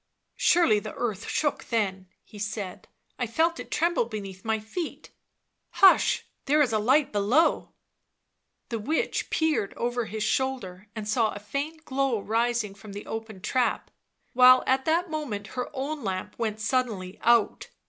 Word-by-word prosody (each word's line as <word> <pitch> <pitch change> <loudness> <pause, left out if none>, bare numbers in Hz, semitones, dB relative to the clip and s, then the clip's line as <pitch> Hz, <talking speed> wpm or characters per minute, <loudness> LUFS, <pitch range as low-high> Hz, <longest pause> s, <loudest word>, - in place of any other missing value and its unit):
" - - -52
Surely 285 -12 +4
the 215 0 -8
earth 220 -6 -3
shook 295 -2 -1
then," 195 -5 -1 0.2
he 210 - -13
said. 205 -2 -5 0.2
" - - -44
I 245 - 0
felt 330 +8 +1
it - - -8
tremble 335 -4 +1
beneath 195 -4 -7
my 220 0 0
feet 265 +11 -6 0.3
— - - -52
hush, 380 - +6 0.2
there 295 +2 +3
is 265 -6 +3
a 215 - +2
light 265 +7 +3
below 215 +11 +2 0.5
!" - - -52
The 230 -2 -2
witch 305 +10 -1
peered 315 -10 0
over 240 0 -1
his 215 0 -4
shoulder 210 -6 -2
and 215 -2 -5
saw 220 0 +1
a 205 - -7
faint 295 +9 -5
glow 265 -3 0
rising 225 0 0
from 200 0 -12
the 205 - -7
open 220 -3 -6
trap, 250 +5 0 0.4
while 255 +1 +7
at 265 0 +1
that 335 +2 +1
moment 230 -11 -4
her 250 -1 -3
own 280 +1 -4
lamp 185 -2 -3
went 220 -2 -2
suddenly 220 -6 -1
out. 235 -2 +2
230 Hz, 170 wpm, -27 LUFS, 210-275 Hz, 0.5 s, while